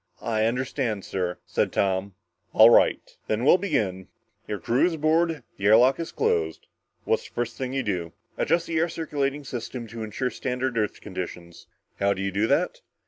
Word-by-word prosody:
"I 110 -1 +1
understand, 120 -3 -1
sir," 90 -2 -2
said - - 0
Tom. 95 0 0 0.4
"All 110 +2 +8
right, - - +3
then 110 +3 0
we'll 180 - +6
begin. 105 - -1 0.4
Your 105 - -2
crew 120 - +2
is 175 - -2
aboard, 160 -1 +1
the 100 - -4
air 110 +1 +8
lock 130 +4 +4
is 165 - -4
closed. 80 -2 0 0.4
What - - +1
is - - -12
the - - -24
first 120 -1 -2
thing 130 -1 -4
you 135 -1 0
do?" 90 -6 -2 0.2
"Adjust 170 - +1
the 165 -1 -1
air 170 +1 +1
circulating 145 -3 -2
system 120 -1 -5
to 115 +1 -7
ensure 110 +4 -2
standard 130 0 -2
Earth 105 -2 -1
conditions." 90 -3 -7 0.3
"How 100 0 +3
do 95 - -4
you 100 - -1
do 100 +3 +1
that?" - - +1
115 Hz, 190 wpm, -25 LUFS, 100-135 Hz, 0.4 s, All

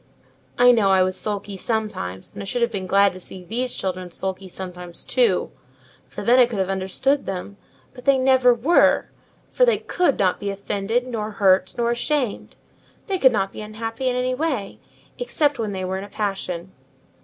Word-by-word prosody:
"I 245 0 +7
know 220 -5 +3
I 190 -1 +5
was 185 0 -1
sulky 205 -1 -2
sometimes, 210 - -3
and - - -7
I - - -6
should 240 +5 -1
have 235 - +1
been 190 -3 -4
glad 200 +1 +4
to 185 - -9
see 185 0 -9
these 245 +6 -2
children 185 -1 -4
sulky 190 +1 -4
sometimes 180 -1 -7
too; - - +1 0.6
for - - -7
then 245 +2 +5
I 245 - +7
could 235 -3 -5
have 190 0 0
understood 195 +9 0
them: 195 +1 -5 0.4
but 250 -1 -13
they 275 -1 +5
never 260 -1 +5
were, 250 +9 +3 0.4
for - - +2
they 485 - +4
could 355 -7 0
not 185 -3 +1
be 205 - -3
offended, 200 +4 -2
nor 225 -4 -3
hurt, 190 -3 +3
nor 235 0 +1
ashamed: 250 -1 -2 0.5
they 385 -2 -1
could 260 -4 +6
not 195 -3 -1
be - - -7
unhappy 225 +4 -3
in 250 - -1
any 250 0 0
way, 260 -8 -2 0.4
except 295 - 0
when 215 -2 -2
they 190 -1 -3
were 190 +1 -2
in - - -6
a 200 - -10
passion." 190 -4 -3
210 Hz, 190 wpm, -22 LUFS, 190-250 Hz, 0.6 s, I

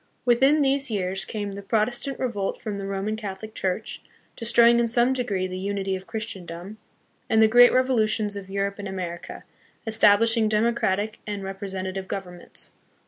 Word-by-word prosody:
Within 270 +5 +4
these 275 0 +1
years 190 -3 -2
came 205 -2 -4
the 200 +1 -7
Protestant 240 +6 0
revolt 215 -7 -2
from 205 -2 -5
the 195 - -5
Roman 195 +2 -2
Catholic 215 0 -7
Church, 190 +3 -3 0.3
destroying 235 0 +5
in 235 - +2
some 240 +3 +3
degree 210 -8 -1
the 185 0 -5
unity 195 0 -2
of 190 0 -8
Christendom; 195 -2 -6 0.5
and 220 - +3
the 220 - +7
great 245 +2 +7
revolutions 220 -5 +1
of 195 -1 -8
Europe 200 +1 -2
and 200 - -5
America, 180 -3 -6 0.4
establish 220 +1 +4
ing 220 -2 +2
democratic 215 -1 0
and 205 -1 -4
representative 190 -1 -5
governments. 180 -3 -7
210 Hz, 155 wpm, -25 LUFS, 195-230 Hz, 0.5 s, the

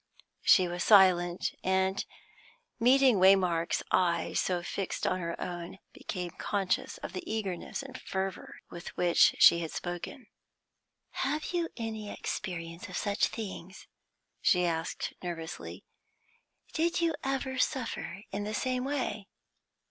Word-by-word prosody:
She 185 -2 +6
was 175 0 -3
silent, 180 -4 +5
and, 190 +1 +1 0.8
meeting 255 0 +5
Waymark's 180 -3 +4
eyes 170 -2 +2
so 180 -2 0
fixed 195 +2 -3
on 185 - +1
her 170 -1 -4
own, 175 +1 -5 0.2
became 180 -3 -5
conscious 195 +1 -1
of - - -5
the 185 - -4
eagerness 205 +2 -3
and 265 -1 -9
fervour 190 0 -4 0.2
with 175 - -8
which 175 -1 +5
she 170 - +8
had 165 -1 -3
spoken. 175 - -5 0.9
"Have 300 +5 -2
you 340 -1 0
any 220 -3 -4
experience 170 -3 -5
of - - -4
such 205 -1 +1
things?" 190 -3 -7 0.6
she 180 -1 +4
asked 165 -1 -2
nervously. 170 -2 -6 0.9
"Did 335 +2 +1
you 335 -1 +2
ever 265 -1 -2
suffer 220 -7 -2
in 200 +1 -3
the 215 +1 -3
same 255 -1 -1
way?" 255 -7 -2
190 Hz, 125 wpm, -30 LUFS, 175-230 Hz, 0.9 s, she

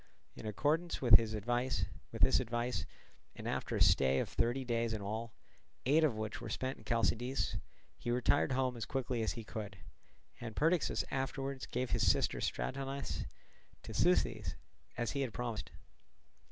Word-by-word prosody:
In - - -7
accordance 155 - 0
with 120 -7 +9
this 110 -1 -2
advice, 120 +4 0 1.5
and - - -6
after - - -2
a - - -1
stay 65 0 +4
of - - 0
thirty 120 +3 0
days 115 -1 0
in 110 - -3
all, 110 +3 -3 0.5
eight 150 +5 +5
of 145 -8 +3
which 110 0 -4
were - - -5
spent 130 +1 -2
in - - -15
Chalcidice, 115 +3 0 0.4
he - - -4
retired 125 +3 +3
home 130 -1 +1
as 115 - -4
quickly 130 -3 -1
as 110 - 0
he 115 - -6
could; 105 -3 -6 0.6
and 115 -2 -6
Perdiccas 165 +2 +2
afterwards 135 0 -2
gave 125 0 -2
his 105 -6 +5
sister - - 0
Stratonice 135 +1 -2 0.6
to - - -7
Seuthes 90 -4 +2 0.4
as 120 -1 -1
he 140 - -1
had 125 -5 -2
promised. 120 -3 -3
120 Hz, 155 wpm, -35 LUFS, 110-135 Hz, 1.5 s, with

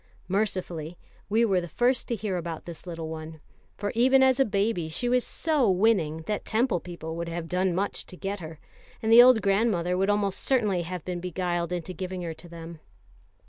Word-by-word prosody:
Mercifully 180 -5 -2 0.3
we 225 +3 +3
were 190 -4 +2
the 175 - -6
first 245 +8 +1
to 235 - -1
hear 210 -3 -3
about 170 -2 -5
this 170 +1 -9
little 165 -2 -5
one; 160 0 -7 0.4
for 205 0 -2
even 260 +3 +5
as 260 0 +4
a 270 - +5
baby 200 -5 0
she 200 +10 -1
was 250 0 +3
so 300 -8 +1
winning 180 -5 +2
that 210 +5 -3
Temple 230 -4 +1
people 165 -2 -7
would 170 0 -4
have 165 0 -4
done 180 0 0
much 200 +2 -2
to 180 - -11
get 200 +2 -4
her, 160 -2 -9 0.4
and 220 - +1
the 235 +1 +10
old 245 -4 +6
grandmother 195 -3 +2
would 195 +2 +1
almost 205 -2 +1
certainly 210 -9 +1
have 175 -1 -6
been 180 -1 -3
beguiled 175 -1 -2
into 180 +1 -4
giving 185 0 -5
her 165 -1 -4
to 170 +2 -14
them. 165 -1 -9
185 Hz, 200 wpm, -27 LUFS, 170-220 Hz, 0.4 s, the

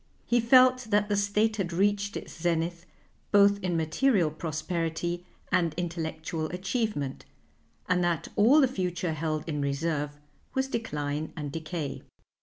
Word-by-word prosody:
He 240 - +3
felt 255 +1 +5
that 205 0 +2
the 205 - +2
State 210 +2 +1
had 185 -4 -2
reached 205 +3 +1
its - - -8
zenith 170 +1 -1 0.4
both 200 0 +5
in 180 -3 0
material 165 - +2
prosperity 165 +2 -3 0.2
and 165 -3 +2
intellectual 160 -2 -3
achievement, 185 - -2 0.6
and 180 0 +2
that 175 -2 0
all 245 +9 +6
the 265 - +5
future 180 -6 -2
held 155 0 -2
in 150 -3 -2
reserve 145 +1 -1 0.4
was 265 0 +1
decline 150 - -3
and 145 -2 -4
decay. 155 -1 -4
175 Hz, 135 wpm, -28 LUFS, 160-205 Hz, 0.6 s, all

